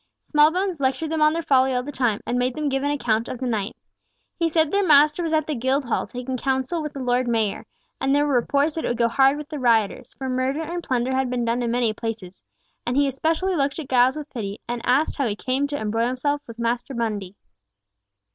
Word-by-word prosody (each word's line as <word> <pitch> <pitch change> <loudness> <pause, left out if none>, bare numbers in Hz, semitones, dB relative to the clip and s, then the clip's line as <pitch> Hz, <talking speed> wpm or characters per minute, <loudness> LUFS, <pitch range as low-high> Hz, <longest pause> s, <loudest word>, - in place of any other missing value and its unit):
Smallbones 335 +4 +2
lectured 280 +4 -1
them 320 -1 -1
on 305 0 +5
their 335 0 -2
folly 265 -2 +3
all 250 - 0
the 290 - -6
time, 245 -6 0
and 245 +1 -1
made 250 0 0
them 300 -1 -1
give 270 0 0
an 285 - 0
account 235 -6 0
of - - -5
the 260 - -4
night. 220 -3 -2 0.6
He 335 -1 0
said 315 -1 +2
their 400 0 +2
master 300 0 +5
was 330 -2 -2
at 310 -1 +2
the 310 - -2
Guildhall 260 0 0
taking 250 +1 -5
counsel 265 +6 -1
with 300 -1 -5
the 275 -3 -5
Lord 250 0 +1
Mayor, 225 -4 -1 0.3
and 270 +1 +2
there 290 +1 +3
were 290 - 0
reports 280 +5 +2
that 320 - -4
it - - -1
would 240 - -1
go 235 0 +3
hard 270 +4 +3
with 300 0 -8
the 300 -2 -5
rioters, 235 -1 +1
for 265 - -5
murder 260 +4 -1
and 345 +2 -4
plunder 255 -1 0
had 265 -1 0
been 245 -1 -1
done 235 +2 0
in 240 - -1
many 235 -2 +1
places, 215 -5 -6 0.4
and 245 +2 -1
he 285 - +4
especially 320 +7 0
looked 280 -2 0
at 310 -5 -6
Giles 255 +1 +4
with 300 -1 -6
pity, 205 -4 -5
and 240 0 -3
asked 275 +5 +2
how 275 -4 +1
he 205 - -2
came 265 +5 -1
to 290 0 -3
embroil 225 +1 0
himself 285 +3 -1
with 230 -1 -10
Master 240 +3 -2
Mundy? 210 -5 -3
260 Hz, 240 wpm, -23 LUFS, 240-295 Hz, 0.6 s, on